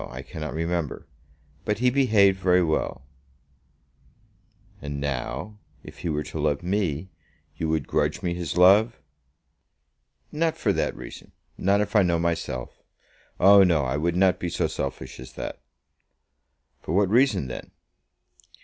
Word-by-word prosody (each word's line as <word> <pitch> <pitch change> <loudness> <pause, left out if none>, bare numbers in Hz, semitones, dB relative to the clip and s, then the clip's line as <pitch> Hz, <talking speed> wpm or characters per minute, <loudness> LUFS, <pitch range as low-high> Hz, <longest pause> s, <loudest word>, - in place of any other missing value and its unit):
I - - -8
cannot 75 -1 -6
remember. 85 -1 -2 0.6
But 105 - -1
he 125 +2 +2
behaved 105 -8 +4
very 90 -1 +3
well." 80 -5 -2 1.8
"And 70 0 -5
now, 70 - -4 0.2
if - - -12
he 85 - -3
were 75 -1 -1
to 80 - -7
love 75 0 0
me, 95 -2 -1 0.4
you 80 - -3
would 80 -3 0
grudge - - -1
me 85 - 0
his 85 -2 -4
love?" 100 +6 +5 1.3
"Not 160 +1 0
for - - +1
that - - -1
reason, - - -11 0.2
not 100 +2 +2
if 105 - -3
I 105 - +7
know 85 -2 +2
myself. 80 -7 -3 0.6
Oh 100 +2 +8
no! 80 -6 +2
I 65 +2 -1
would 85 +4 0
not 95 0 +3
be 85 - -3
so - - -1
selfish 65 -2 -5
as 65 - -10
that." - - -6 1.2
"For 80 - -3
what 100 0 +3
reason 115 - +3
then?" - - -7
85 Hz, 145 wpm, -25 LUFS, 75-100 Hz, 1.8 s, Oh